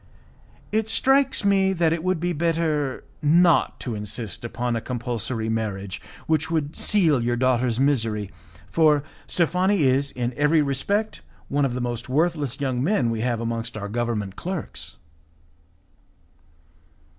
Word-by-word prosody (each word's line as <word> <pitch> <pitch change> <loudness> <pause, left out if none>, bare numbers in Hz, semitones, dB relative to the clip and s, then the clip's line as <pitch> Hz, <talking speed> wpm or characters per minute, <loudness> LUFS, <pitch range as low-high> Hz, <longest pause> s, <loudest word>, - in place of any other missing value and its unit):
"It 220 +1 0
strikes 270 -3 +3
me 195 -1 +3
that 165 -3 +2
it 165 -1 -3
would 185 -2 0
be 175 +1 -1
better 155 -4 0 0.2
not 170 +3 +4
to 120 - -3
insist 105 -1 -5
upon 120 +1 -2
a 115 - -2
compulsory 120 -2 -3
marriage 105 -3 -3 0.2
which 160 0 +1
would 155 -2 -1
seal 165 - +3
your 120 +1 0
daughter's 125 -1 +1
misery, 115 -7 +1 0.4
for 150 -3 +4 0.2
Steffani 180 +3 +1
is, 135 +1 +2
in 125 -1 -3
every 150 +1 +3
respect, 200 +11 -1 0.3
one 145 0 +2
of 125 -3 -2
the 125 - -2
most 120 +1 -4
worthless 150 -2 0
young 130 -3 -1
men 140 - +2
we 115 -1 -2
have 120 -1 0
amongst 115 0 -3
our 100 -1 -4
government 110 -4 -2
clerks." 180 -2 -5
135 Hz, 140 wpm, -24 LUFS, 120-165 Hz, 0.4 s, not